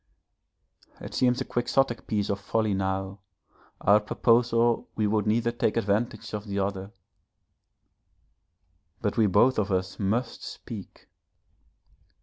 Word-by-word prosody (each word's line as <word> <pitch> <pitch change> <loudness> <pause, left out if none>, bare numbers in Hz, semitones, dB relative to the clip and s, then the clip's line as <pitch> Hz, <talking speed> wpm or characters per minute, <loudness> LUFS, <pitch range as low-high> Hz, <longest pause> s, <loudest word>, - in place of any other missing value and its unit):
_ - - -10
It - - -8
seems 125 -1 +2
a - - -2
Quixotic 120 0 0
piece 105 -1 0
of 100 - -2
folly 110 +1 0
now, 95 +1 -2 0.6
our 100 +2 +5
proposal 115 +2 +2
we 110 - 0
would 105 0 +1
neither 115 +2 +2
take 115 -1 0
advantage 110 +1 -1
of 105 +1 -5
the 100 0 -3
other, 100 0 -2 2.1
but 105 -3 -1
we 110 -3 +4
both 110 +6 +4
of 105 -1 -1
us 95 0 -2
must 115 +4 -1
speak. - - -9
105 Hz, 130 wpm, -27 LUFS, 100-115 Hz, 2.1 s, our